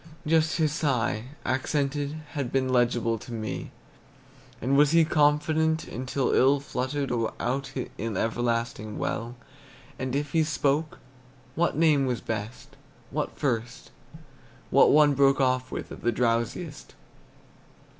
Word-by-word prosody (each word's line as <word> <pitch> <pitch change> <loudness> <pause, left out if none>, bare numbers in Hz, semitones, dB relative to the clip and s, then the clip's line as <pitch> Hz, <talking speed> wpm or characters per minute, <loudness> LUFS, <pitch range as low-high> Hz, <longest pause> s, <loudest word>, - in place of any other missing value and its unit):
Just 160 +1 +2
his 155 -3 +2
sigh, 125 -7 0 0.2
accented, 140 +2 -1 0.2
Had 140 -5 -3
been 135 -1 +1
legible 120 -2 +1
to 120 - -11
me. 110 -2 -4 0.9
And 130 +4 +1
was 145 +1 +5
he 165 +1 +5
confident 155 +1 +2
until 130 +1 -2
Ill 135 +2 +4
fluttered 135 +1 -3 0.3
out 135 +2 -2 0.3
in 110 0 -3
everlasting 115 -2 -1
well? 115 +2 -3 0.6
And 130 0 -2
if 145 0 -2
he 160 0 +3
spoke, 150 0 0 0.6
what 170 0 0
name 150 -4 +4
was 125 -3 -1
best, 110 +2 -6 0.4
What - - -3
first, 120 -4 -2 0.8
What 135 - +6
one 150 -1 +5
broke 140 0 +4
off 130 -1 +1
with - - -6
At - - -9
the 120 - +1
drowsiest? 120 +7 -2
135 Hz, 125 wpm, -27 LUFS, 120-150 Hz, 0.9 s, What